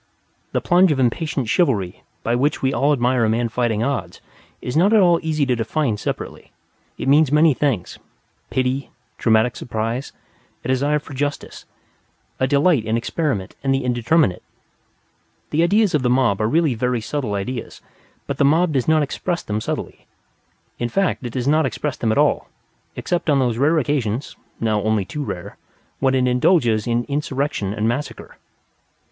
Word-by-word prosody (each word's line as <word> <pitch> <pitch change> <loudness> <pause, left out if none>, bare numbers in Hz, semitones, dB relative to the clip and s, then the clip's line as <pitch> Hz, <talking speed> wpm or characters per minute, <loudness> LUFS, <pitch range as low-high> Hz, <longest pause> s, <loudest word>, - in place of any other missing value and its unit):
The - - 0
plunge 180 0 +4
of 140 - 0
impatient 135 +1 0
chivalry 105 - 0 0.2
by 115 - 0
which 140 +4 0
we 130 +1 +2
all 145 +2 +2
admire 125 -3 +2
a 110 - +2
man 115 +1 0
fighting 115 -2 0
odds 115 -11 -3 0.4
is 125 - -5
not 190 +7 +4
at 220 - +6
all 175 -3 +4
easy 155 -3 0
to 125 -2 +1
define 120 +2 -1
separately, 105 - -6 0.5
it - - -4
means 145 0 +4
many 150 +1 +5
things, 130 -9 -2 0.5
pity, 130 +1 -1 0.3
dramatic 110 +1 +3
surprise, 115 +2 -3 0.5
a - - -3
desire 140 +3 +2
for 145 -1 -9
justice, 145 +2 -4 0.7
a 130 - +2
delight 145 -1 +3
in 110 +1 0
experiment 115 - -2
and 135 -1 +2
the 135 - -1
indeterminate. 120 - +1 1.1
The 155 - +2
ideas 200 +3 +3
of 150 - +2
the 125 - +1
mob 125 -5 +2
are 110 - +1
really 160 -1 +2
very 125 +1 -1
subtle 115 -2 -3
ideas; 115 +4 -5 0.5
but - - -5
the - - +4
mob 160 +4 +3
does 130 -3 0
not 155 -1 +4
express 175 +5 -3
them 105 +1 -3
subtly. - - -5 0.7
In 120 - -1
fact, 195 -1 0
it 115 - -9
does 125 0 -2
not 155 +2 +3
express 150 -3 -3
them 115 - -1
at 110 - 0
all, - - +2 0.5
except 175 -2 -2
on 145 - +4
those 120 -3 0
occasions 140 -5 0 0.2
(now 110 -2 0
only 110 -2 0
too 150 +9 -5
rare) 95 -6 -6 0.4
when 135 0 +2
it 130 -1 +2
indulges 125 - +2
in 120 0 +1
insurrection 140 -6 -2
and 110 +1 -1
massacre. 130 +6 -4
130 Hz, 170 wpm, -21 LUFS, 115-150 Hz, 1.1 s, at